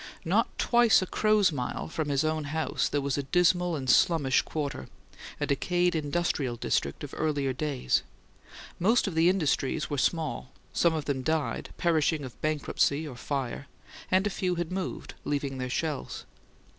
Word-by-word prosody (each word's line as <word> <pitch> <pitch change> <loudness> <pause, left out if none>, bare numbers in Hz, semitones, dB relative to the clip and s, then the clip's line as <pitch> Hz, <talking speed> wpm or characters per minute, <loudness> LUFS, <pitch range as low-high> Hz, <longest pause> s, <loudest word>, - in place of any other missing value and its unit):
Not - - +1
twice 235 -5 +4
a - - -2
crow's 215 0 +3
mile 125 -5 -3
from 160 -2 -3
his 140 0 +1
own 155 -1 -1
house 155 +2 -1
there 145 - 0
was 140 0 -1
a 140 -1 -5
dismal 180 -1 +3
and 135 -3 -4
slummish 135 0 +4
quarter, 140 - -4 0.5
a - - 0
decayed 175 +5 +1
"industrial 145 -4 -1
district" 70 -10 -1
of 145 - -7
earlier 145 -4 0
days. 135 - 0 0.8
Most 225 +7 +3
of 195 - -2
the 165 +2 +4
industries 155 -4 0
were 145 - 0
small; 155 -4 -1 0.2
some 170 -2 +3
of 155 - -3
them 135 -2 -1
died, 160 +3 -1
perishing 160 -3 +1
of 130 -3 -10
bankruptcy 155 0 0
or 135 - -8
fire; 135 +1 -4 0.4
and 190 +2 +3
a 205 - 0
few 185 -2 -1
had 170 -1 -3
moved, 185 -1 -4
leaving 140 -2 -2
their 125 0 -3
shells. 150 +2 -3
155 Hz, 165 wpm, -28 LUFS, 140-175 Hz, 0.8 s, twice